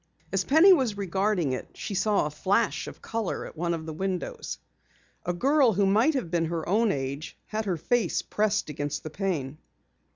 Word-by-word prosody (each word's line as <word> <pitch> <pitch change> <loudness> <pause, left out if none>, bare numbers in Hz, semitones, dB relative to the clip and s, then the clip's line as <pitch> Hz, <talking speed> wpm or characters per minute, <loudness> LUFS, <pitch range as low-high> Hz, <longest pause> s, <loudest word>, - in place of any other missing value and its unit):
As 195 -1 +2
Penny 320 - +7
was 255 - +1
regarding 190 -5 0
it, 130 - -5
she 205 - -5
saw 200 0 +2
a 150 - -3
flash 200 +9 0
of - - -10
color 225 -4 -3
at - - -10
one 170 +1 -1
of 160 -1 -7
the 160 - -5
windows. 185 +2 -3 0.7
A - - +2
girl 265 +6 +3
who 200 +1 +2
might 225 +11 +3
have 185 -11 -2
been 170 -2 +1
her 165 -1 -3
own 215 +3 +3
age 140 +1 -4
had 220 0 -3
her 185 -4 -1
face 210 +4 0
pressed 210 -6 0
against 145 0 -3
the 155 - -6
pane. 155 -6 -2
195 Hz, 190 wpm, -27 LUFS, 160-215 Hz, 0.7 s, Penny